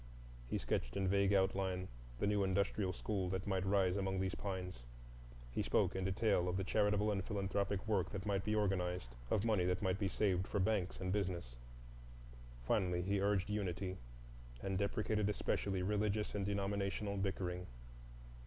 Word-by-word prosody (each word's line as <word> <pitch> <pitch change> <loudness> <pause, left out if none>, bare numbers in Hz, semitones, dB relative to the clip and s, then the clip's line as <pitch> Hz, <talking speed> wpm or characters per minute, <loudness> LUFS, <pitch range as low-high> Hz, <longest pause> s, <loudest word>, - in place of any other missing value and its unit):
He - - -1
sketched - - -2
in 95 -1 +1
vague 100 +1 +3
outline 95 -1 +1 0.3
the - - 0
new 100 -1 +2
Industrial 95 0 +1
School 95 0 -2
that 95 0 -2
might 95 -2 0
rise 95 -2 +3
among 95 -1 0
these 95 0 0
pines, 95 -7 -4 0.7
he - - -1
spoke - - +2
in 95 0 -1
detail 95 -2 +2
of 90 - -1
the 95 - 0
charitable 105 +1 +2
and 100 -2 -1
philanthropic 100 +1 -1
work 100 -5 +1
that 100 0 -5
might 100 -2 0
be 105 +1 0
organized, 90 - 0 0.2
of 105 - +1
money 105 -5 +3
that 90 +2 0
might 95 0 +1
be 100 - +1
saved 95 -1 +1
for 100 - -1
banks 100 -2 +1
and 95 -1 -1
business. 90 -11 -2 1.1
Finally 90 +7 +1
he 100 +1 +1
urged 100 -1 +1
unity, 95 -2 -2 0.7
and 95 -1 -1
deprecated 105 +1 +1
especially 100 -2 0
religious 105 +1 0
and 100 -1 -1
denominational 100 0 -1
bickering. 90 -2 -2
95 Hz, 160 wpm, -38 LUFS, 95-100 Hz, 1.1 s, vague